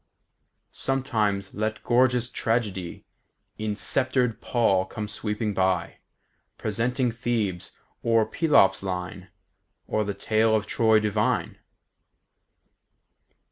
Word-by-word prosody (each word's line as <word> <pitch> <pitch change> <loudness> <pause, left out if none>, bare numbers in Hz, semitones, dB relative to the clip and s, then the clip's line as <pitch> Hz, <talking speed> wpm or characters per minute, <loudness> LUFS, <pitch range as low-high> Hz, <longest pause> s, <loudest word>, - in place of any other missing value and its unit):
··· - - -47 0.7
Sometime 110 -7 0
let 110 +1 -3
gorgeous 125 0 +2
Tragedy 105 -7 -2 0.5
In 105 -1 -2
sceptred 125 +3 0
pall 100 -6 +2
come 105 +2 -6
sweeping 105 0 -2
by, 95 -2 0 0.6
Presenting 120 +3 0
Thebes, 110 -6 -2 0.2
or 115 -1 +3
Pelops' 150 - +3
line, 90 -1 -5 0.6
Or 110 - 0
the 100 -1 -4
tale 110 0 +2
of 105 -1 0
Troy 110 0 +3
divine." 105 0 -1
110 Hz, 100 wpm, -25 LUFS, 100-120 Hz, 0.7 s, or